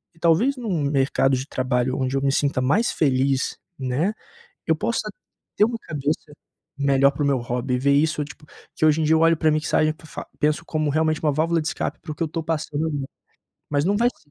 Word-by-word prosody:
E - - -23
talvez 200 +13 +3
num 205 -11 -2
mercado 135 -1 +2
de 130 - -4
trabalho 130 -1 0
onde 130 0 -1
eu - - -1
me 140 0 +2
sinta 140 -1 +1
mais 190 - +2
feliz, 135 -2 +1 0.2
né. 140 +10 -1 0.5
Eu - - +3
possa - - -2 0.5
ter 210 - +5
uma 235 0 -2
cabeça 150 0 -3 0.5
melhor 140 -1 +4
para 145 +1 -3
o - - +2
meu 140 -2 +2
hobby, 125 +1 -2
ver 140 +2 +3
isso 150 +1 +2
tipo 150 +1 -13 0.3
que - - +1
hoje 155 +1 +4
em - - +1
dia 160 +1 +4
eu - - +3
olho 165 0 +5
pra 160 - +2
mixagem 155 0 +2
pra 160 - -18
fa - - -8
penso 150 +3 +1
como 155 -2 -1
realmente 155 +1 +1
uma 150 -2 +2
válvula 165 +3 +1
de 155 - -4
escape - - -3
para - - -8
o 150 - -6
que - - -14
eu - - -1
tô 165 +1 -4
passando, 160 0 -2 0.8
mas 145 +1 +1
não 200 +3 +2
vai 235 +3 +3
ser 145 - -25
150 Hz, 220 wpm, -23 LUFS, 135-160 Hz, 0.8 s, ter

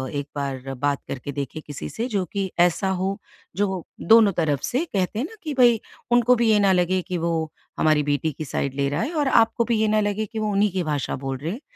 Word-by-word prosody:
एक 145 0 -3
बार 135 -1 -4
बात 145 -1 +1
करके 140 +2 -5
देखें 140 +2 -5
किसी 145 -1 -6
से, 235 +3 -3
जो 200 -6 -1
कि 195 -2 -2
ऐसा 180 +2 +3
हो, 195 +1 -1 0.4
जो 190 -4 -1 0.2
दोनों 220 -2 +6
तरफ 150 -4 +1
से, 275 +8 0
कहते 200 - -2
हैं 260 - 0
ना 445 - -13
कि 305 - -3
भई, 235 -3 +5 0.3
उनको 245 +1 +5
भी 235 -1 +2
ये 210 - +4
ना 195 -1 +4
लगे 180 +1 +2
कि 180 0 -4
वो 165 -2 -1 0.3
हमारी 155 -1 +3
बेटी 155 +2 0
की 155 +2 -7
साइड 135 0 -2
ले 140 0 0
रहा 145 +4 -1
है 320 - -2
और 295 -3 +1
आपको 230 -2 +3
भी 235 -1 +1
ये 220 - +3
ना 215 0 +3
लगे 205 +1 -1
कि 220 +2 -6
वो 215 -1 -1
उन्हीं 205 0 +2
की 185 -1 -1
भाषा 145 -2 -1
बोल 135 -1 -2
रहे 155 +5 -4
हैं। 235 +9 -6
190 Hz, 245 wpm, -23 LUFS, 150-220 Hz, 0.4 s, दोनों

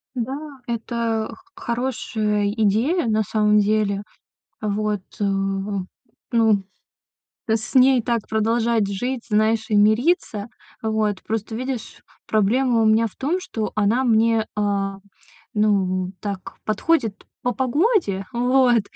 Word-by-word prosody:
Да, 255 +3 -2 0.3
это 230 -1 -1
х - - -13 0.2
хорошая 220 -4 -1
идея, 225 - +1
на 220 0 +2
самом 210 0 +3
деле. 205 -1 +1 0.6
Вот, 210 -1 -1 0.2
э, - - +2 1.1
ну, 220 -4 +3 0.9
т 220 - +3
с 220 +4 -5
ней 260 -1 +6
так 230 -1 -1
продолжать 225 0 +1
жить, 245 +5 -3
знаешь, 215 +1 +2
и 215 - +2
мириться. 215 - +2 0.3
Вот, 220 -3 -1
просто 220 0 -3
видишь, 255 -1 -5 0.3
проблема 230 +3 +2
у - - +3
меня 220 +1 +4
в 210 - -16
том, 310 +8 -1
что 220 - -4
она 215 +5 +2
мне, 225 -2 +3
э, 200 -1 0 0.6
ну, 190 -3 +1
так, 200 -3 -5
подходит 220 0 0 0.2
по 245 - 0
погоде, 265 - +1
вот, 245 -1 +3
220 Hz, 120 wpm, -22 LUFS, 210-240 Hz, 1.1 s, ней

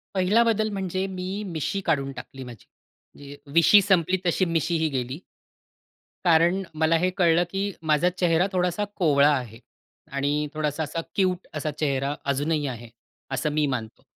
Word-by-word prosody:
पहिला 195 +5 +4
बदल 220 -1 +1
म्हणजे 190 -1 -2
मी 190 +2 -5
मिशी 175 +4 -3
काढून 140 -4 0
टाकली 135 0 -9
माझी. 120 -4 -11 0.5
जे 140 0 -10 0.2
20शी 170 +5 +7
संपली 190 -2 +2
तशी 180 +2 +2
मिशी 165 0 0
ही 160 0 +1
गेली. 130 +2 -3 1.1
कारण 175 +3 +4
मला 160 +1 +2
हे 180 +2 +1
कळलं 175 -1 +4
की 195 +1 -2 0.2
माझा 170 +4 +3
चेहरा 175 +1 +2
थोडासा 180 +2 0
कोवळा 145 -5 +4
आहे 115 -2 -8 0.5
आणि 145 +2 0
थोडासा 155 0 -2
असा 165 +3 -4
क्यूट 185 -2 0
असा 155 0 -2
चेहरा 140 -1 -1 0.2
अजूनही 145 +2 0
आहे, 120 -2 -7 0.4
असं 150 +3 -1
मी 150 0 +1
मानतो. 115 -3 -4
160 Hz, 155 wpm, -25 LUFS, 145-185 Hz, 1.1 s, 20शी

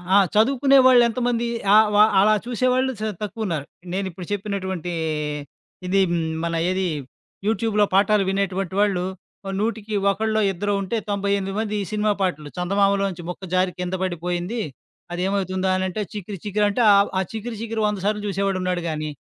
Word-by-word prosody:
ఆ - - +8 0.2
చదువుకునే 270 +5 +4
వాళ్ళెంతమంది, 240 -1 +3 0.3
ఆ - - +9 0.2
వ - - +4 0.2
అలా 210 +2 +5
చూసేవాళ్ళు 255 +2 +1
చ - - -4 0.2
తక్కువున్నారు. 195 -8 -3 0.3
నేనిప్పుడు 190 -2 -4
చెప్పినటువంటి 190 -4 -3 0.9
ఇది 195 +1 +3 0.4
మన 170 0 -1
ఏది 185 0 0 0.6
యూట్యూబ్‌లో 220 -1 +2
పాఠాలు 205 +1 +4
వినేటువంటి 195 -1 -1
వాళ్ళు, 200 -3 +2 0.4
ఓ 195 - -4
నూటికి 220 -1 -2 0.2
ఒకలో, 220 +2 0
ఇద్దరో 205 +3 -1
ఉంటే 195 +4 -2
98 200 -1 -1
మంది 215 -1 -2
ఈ - - -6
సినిమా 210 0 +2
పాటలు 155 -6 -1
చందమామలో 200 +2 +2
నుంచి 175 -2 -8
ముక్క 180 0 -7
జారి 185 0 +2
కింద 180 +1 -2
పడిపోయింది. 180 +5 -2 0.5
అది 175 - -3
ఏమవుతుందా 190 -1 -1
అని 185 - -1
అంటే, 200 +4 -3
'చికిరి 205 -1 -6
చికిరి' 210 0 +1
అంటే 205 +4 0
ఆ - - +7 0.2
ఆ - - +2
'చికిరి 225 +1 -5
చికిరి' 225 -1 -1
వంద 210 -2 -2
సార్లు 210 0 0
చూసేవాడు 195 -1 -1
ఉన్నాడు 180 -1 -1
గాని, 155 -1 -3
200 Hz, 155 wpm, -23 LUFS, 185-215 Hz, 0.9 s, ఆ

